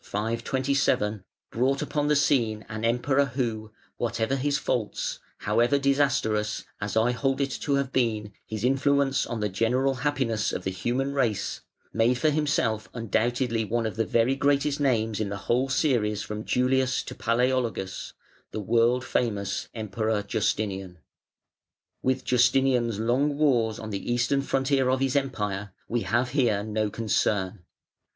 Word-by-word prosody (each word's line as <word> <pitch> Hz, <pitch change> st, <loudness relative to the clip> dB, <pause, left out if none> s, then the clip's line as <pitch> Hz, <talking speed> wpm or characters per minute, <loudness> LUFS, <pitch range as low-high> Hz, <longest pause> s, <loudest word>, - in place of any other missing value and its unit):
527) 115 Hz, -1 st, 0 dB, 0.3 s
brought 130 Hz, +4 st, +1 dB
upon 145 Hz, -1 st, -1 dB
the 150 Hz, -, +3 dB
scene 115 Hz, -7 st, +2 dB
an 110 Hz, 0 st, -6 dB
Emperor 130 Hz, +4 st, +2 dB
who, 115 Hz, -5 st, -3 dB, 0.3 s
whatever 115 Hz, +2 st, -1 dB
his 140 Hz, +1 st, 0 dB
faults, 120 Hz, -7 st, -2 dB, 0.2 s
however 120 Hz, +7 st, +2 dB
disastrous 135 Hz, -7 st, +1 dB, 0.2 s
(as 105 Hz, +1 st, -2 dB
I 115 Hz, +2 st, +3 dB
hold 135 Hz, +2 st, 0 dB
it 140 Hz, -1 st, 0 dB
to 140 Hz, -, +1 dB
have 140 Hz, -1 st, -1 dB
been) 110 Hz, -5 st, 0 dB
his 110 Hz, -1 st, -6 dB
influence 135 Hz, +1 st, +2 dB
on 115 Hz, -2 st, -4 dB
the 105 Hz, -, +1 dB
general 125 Hz, +7 st, +1 dB
happiness 130 Hz, -7 st, 0 dB
of 90 Hz, -, -4 dB
the 95 Hz, -, -2 dB
human 125 Hz, +9 st, -1 dB
race, 115 Hz, -8 st, -1 dB, 0.3 s
made 115 Hz, +2 st, +3 dB
for 155 Hz, +4 st, +2 dB
himself 140 Hz, -8 st, 0 dB
undoubtedly 115 Hz, +1 st, 0 dB
one 115 Hz, +2 st, -1 dB
of 110 Hz, -, -3 dB
the 115 Hz, -, +1 dB
very 115 Hz, +4 st, +2 dB
greatest 140 Hz, +1 st, +1 dB
names 115 Hz, -6 st, +1 dB
in 105 Hz, -2 st, -1 dB
the 100 Hz, -, -4 dB
whole 125 Hz, +3 st, +1 dB
series 115 Hz, -7 st, +1 dB
from 105 Hz, 0 st, -6 dB
Julius 130 Hz, 0 st, +1 dB
to -, -, -7 dB
Palaeologus 120 Hz, -5 st, -1 dB, 0.4 s
the -, -, -5 dB
world 120 Hz, +4 st, +2 dB
famous 100 Hz, -5 st, -1 dB
Emperor 110 Hz, 0 st, -1 dB
Justinian. 100 Hz, -3 st, -2 dB, 1.0 s
With 130 Hz, 0 st, 0 dB
Justinian's 125 Hz, -2 st, +3 dB
long 135 Hz, +6 st, +1 dB
wars 120 Hz, -7 st, +2 dB
on 110 Hz, -1 st, -7 dB
the 100 Hz, +4 st, -3 dB
Eastern 120 Hz, +3 st, +2 dB
frontier 135 Hz, -1 st, +1 dB
of 130 Hz, 0 st, +2 dB
his 135 Hz, 0 st, 0 dB
Empire 105 Hz, -8 st, -2 dB
we 120 Hz, 0 st, -1 dB
have 120 Hz, +6 st, 0 dB
here 120 Hz, -7 st, +1 dB
no 110 Hz, 0 st, -1 dB
concern. 105 Hz, -3 st, -1 dB
120 Hz, 145 wpm, -26 LUFS, 110-135 Hz, 1.0 s, the